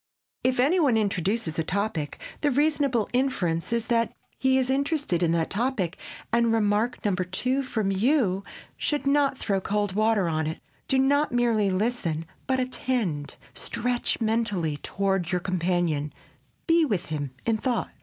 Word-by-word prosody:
If 255 -1 +1
any 300 +9 +4
one 270 -8 +3
introduces 195 -4 0
a - - +2
topic, 180 -5 -2 0.2
the 295 - +3
reasonable 280 -5 +2
inference 205 -10 0
is 235 -1 0
that 230 -1 +1 0.3
he 265 0 +3
is 260 -1 +2
interested 280 - 0
in 170 - +3
that 165 -1 0
topic 210 -6 0 0.4
and 235 -1 +3
remark 220 +2 +1
number 185 -3 +1
two 250 +9 0
from 220 -7 -1
you 200 -2 +2 0.3
should 295 -2 -1
not 275 -1 +3
throw 195 -5 -1
cold 205 0 -1
water 215 -2 +2
on 160 -1 0
it. 160 - -4 0.3
Do 270 - +2
not 285 +3 +3
merely 235 -4 +2
listen, 185 -5 -1 0.2
but 260 -1 +1
attend, 240 - -1 0.2
stretch 245 0 -2
mentally 210 -9 0
toward 195 0 -1
your 180 - +1
companion, 175 -5 0 0.5
be 335 0 +4
with 205 - 0
him 145 -3 -4
in 225 -1 +2
thought. 240 +1 -1
220 Hz, 155 wpm, -26 LUFS, 180-255 Hz, 0.5 s, any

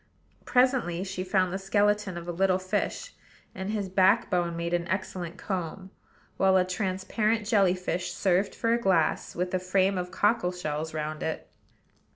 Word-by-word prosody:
Presently 250 -9 +2
she 185 -1 -4
found 185 -1 +1
the 190 - -2
skeleton 205 -1 +1
of 170 0 -7
a - - -2
little 185 +1 +2
fish, 185 - -3 0.4
and 190 +1 -5
his 210 -2 -2
backbone 185 -3 +2
made 170 +1 -3
an 175 0 0
excellent 185 -2 -3
comb; 185 0 -4 0.5
while 190 0 +4
a 180 - +3
transparent 200 +4 -1
jelly 200 -4 +3
fish 180 -1 -3
served 190 +1 +1
for 230 0 +1
a 235 - 0
glass, 185 -6 +1
with 180 +1 -2
a 185 - +2
frame 185 +1 +1
of 180 0 -4
cockle 205 -3 +1
shells 160 -3 -4
round 155 0 -3
it. 160 - -3
185 Hz, 165 wpm, -28 LUFS, 175-200 Hz, 0.5 s, while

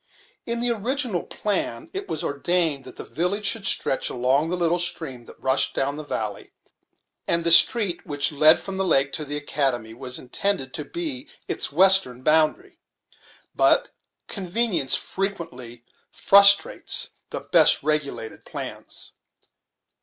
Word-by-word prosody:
In 235 0 -2
the 240 0 +1
original 235 - -2
plan 315 +10 -3
it 390 +1 -5
was 155 - -4
ordained 150 -1 -1
that - - -11
the - - -8
village 185 +6 -3
should 200 -1 +3
stretch 135 - +1
along 130 +6 0
the 180 - -2
little 175 0 0
stream 140 -8 0
that - - -16
rushed 130 +1 0
down 140 +1 -1
the 155 - -7
valley; 110 -8 -5 0.7
and 170 0 +1
the 170 - +2
street 205 -1 +5
which 145 -1 -2
led 155 +2 +5
from 195 -1 -7
the 190 - -1
lake 140 -6 +1
to 155 - -4
the 145 +1 -4
academy 135 -6 -2
was 125 +1 -6
intended 135 +1 -2
to 150 - -6
be 310 - -4 0.2
its - - -4
western 170 -7 +3
boundary. 160 - 0 0.7
But - - +2 0.4
convenience 195 - 0
frequently 145 -12 -5 0.3
frustrates 200 - +4 0.2
the - - -6
best - - +4
regulated 150 -7 -3
plans. - - -7
165 Hz, 140 wpm, -23 LUFS, 140-200 Hz, 0.7 s, street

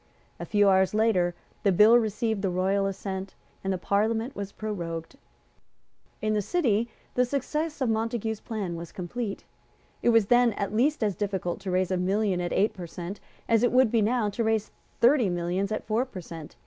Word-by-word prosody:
A 170 - -5
few 205 -1 +3
hours 190 +1 +3
later 185 -6 +2 0.3
the 200 - +3
bill 210 +5 +7
received 220 -2 +1
the 195 - 0
royal 190 +2 +1
assent, 190 0 -5 0.3
and 195 - -1
the 190 - 0
Parliament 225 +7 0
was 200 -1 -5
prorogued. 170 -3 -5 1.1
In 215 0 +1
the 210 - +1
City 235 - +1 0.2
the 250 - +3
success 295 +4 -2
of 255 - +2
Montague's 225 -1 -1
plan 205 -7 -4
was 170 0 -7
complete. 200 +4 -5 0.6
It - - +3
was 230 -3 +5
then 240 +1 +4
at 200 0 -3
least 275 +3 +2
as 205 -3 0
difficult 190 -4 -2
to 195 -1 -6
raise 185 0 +1
a 185 - +1
million 190 0 +1
at 175 - -3
eight 205 +3 +2
per 180 -3 -7
cent. 175 +4 -7 0.3
as 225 -1 +3
it 245 - +3
would 255 -2 +4
now 225 0 +2
be - - -7
to 230 +3 -2
raise 220 -1 0 0.3
thirty 240 -3 +4
millions 175 +3 -1
at 215 - -2
four 220 +3 +1
per 230 -8 -9
cent. 165 -2 -10
205 Hz, 190 wpm, -27 LUFS, 190-230 Hz, 1.1 s, bill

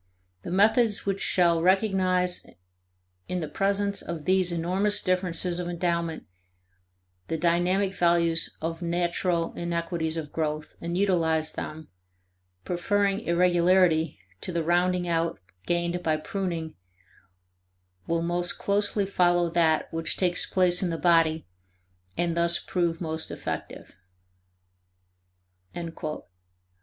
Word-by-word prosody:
The - - -7
methods 210 +4 +3
which 195 0 -1
shall 170 -2 +3
recognize 185 -1 +2 0.8
in 180 - -2
the 160 - -3
presence 200 +3 0
of 165 -3 -6
these 185 -1 +2
enormous 185 +5 0
differences 180 -1 0
of 175 - -3
endowment 170 -2 -2 1.0
the 160 - -2
dynamic 175 +4 +1
values 170 -2 +2
of 165 +1 -3
natural 170 0 -1
inequalities 170 -1 -2
of 155 -2 -5
growth, 155 -1 -3
and 170 +1 -3
utilize 165 -5 +1
them, 155 0 -7 0.8
preferring 200 +3 0
irregularity 175 - +3 0.2
to - - -4
the 170 -1 -1
rounding 175 +1 +1
out 165 0 0 0.3
gained 175 0 0
by 155 -2 +1
pruning 165 -2 -4 1.3
will 165 0 0
most 175 +1 0
closely 205 0 0
follow 175 -3 +2
that 160 -2 +2
which 165 0 -1
takes 180 -1 +1
place 180 -1 +3
in 185 - 0
the 165 - -2
body 165 -2 +3 0.7
and 170 -1 0
thus 170 0 +2
prove 170 -2 -2
most 160 -1 -3
effective." - - -6
175 Hz, 110 wpm, -26 LUFS, 165-185 Hz, 1.3 s, methods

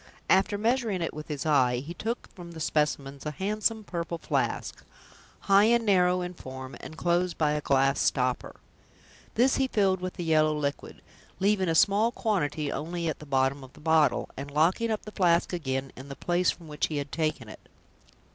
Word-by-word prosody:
After 195 +2 +3
measuring 220 -4 0
it - - -3
with 155 0 -8
his 150 -2 -4
eye, 130 -5 +3
he 145 +7 -6
took 230 +6 -4
from 175 -2 -10
the 160 - -8
specimens 145 -3 -1
a 150 - -2
handsome 215 - -1
purple 170 -3 -4
flask, - - -2 0.6
high 200 +1 +5
and 235 0 +3
narrow 180 -3 +3
in 180 0 -4
form, 130 -4 -9
and 155 - -10
closed 175 +1 0
by 150 -2 +2
a 150 0 -1
glass 135 0 +2
stopper. 125 -2 0 0.8
This 255 +4 +3
he 265 - +2
filled 195 -6 +1
with 185 0 -4
the 175 - -4
yellow 155 -2 +3
liquid, 140 -1 -4 0.4
leaving 195 -2 +2
a 165 - +1
small 205 +6 +4
quantity 160 -11 -1
only 170 +2 -3
at 155 - -4
the 150 - -11
bottom 135 0 +1
of 130 - -13
the - - -16
bottle, 155 -3 +2
and 140 +2 -6
locking 165 +10 +2
up 215 -1 -2
the 210 - -9
flask 175 -3 +2
again 135 -5 -2
in 135 +2 -10
the 140 - -6
place 175 +3 +1
from 165 -2 -5
which 150 -1 -1
he 155 - -4
had 140 0 -4
taken 155 -7 -2
it. 105 - -13
165 Hz, 195 wpm, -28 LUFS, 145-190 Hz, 0.8 s, high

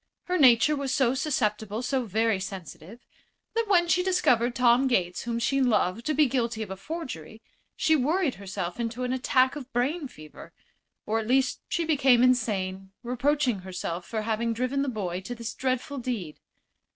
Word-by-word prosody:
Her 365 -1 -1
nature 260 +2 +6
was 280 -2 -3
so 260 -3 +2
susceptible, 220 -6 -1
so 260 0 -1
very 220 0 +1
sensitive, 190 - -9 0.5
that 460 -1 0
when 350 -4 +4
she 340 +2 +3
discovered 250 -10 +2
Tom 250 +1 +4
Gates, 180 -8 0
whom 235 -1 -2
she 275 +4 +1
loved, 230 -2 +1
to 305 - +1
be 305 +1 +5
guilty 235 -4 -1
of 200 - -9
a - - -4
forgery, 220 - -7 0.4
she 315 - +3
worried 305 +2 +1
herself 190 -1 -5
into 235 +1 -3
an 250 0 -1
attack 260 +1 +2
of 275 -3 -8
brain 280 +6 -1
fever; 155 -10 -13 0.5
or 220 +1 0
at 220 - -5
least 265 +2 +1
she 340 - -1
became 265 -6 +4
insane, 195 -6 0
reproaching 250 -1 0
herself 180 -2 -5
for 220 +3 -3
having 230 +1 -1
driven 255 +4 -1
the 280 - 0
boy 190 -6 -3
to 245 +6 -6
this 235 -1 -6
dreadful 260 +2 -2
deed. 220 -11 -4
245 Hz, 175 wpm, -27 LUFS, 215-275 Hz, 0.5 s, nature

